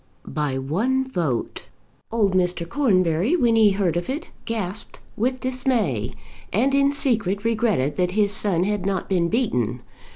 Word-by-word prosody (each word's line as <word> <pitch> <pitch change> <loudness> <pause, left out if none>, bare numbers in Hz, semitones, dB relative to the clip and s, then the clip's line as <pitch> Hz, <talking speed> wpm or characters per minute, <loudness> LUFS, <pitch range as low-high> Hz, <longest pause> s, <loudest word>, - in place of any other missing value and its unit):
By 145 -3 -2
one 225 - 0
vote! 150 - -2 0.4
Old 210 -4 +2
Mr. 180 -2 0
Cornbury 185 - +2
when 240 -9 +3
he 220 -2 +6
heard 195 -4 0
of 175 +5 -2
it 285 +5 -4
gasped 210 -3 -4 0.2
with 255 +4 0
dismay, 235 - 0 0.4
and 260 +7 +2
in 275 0 +4
secret 220 - 0
regretted 215 - +1
that 180 -1 +2
his 205 -2 +3
son 195 -4 +1
had 205 -1 -1
not 195 -1 -1
been 175 -3 +1
beaten. 125 - 0
200 Hz, 150 wpm, -23 LUFS, 170-240 Hz, 0.4 s, he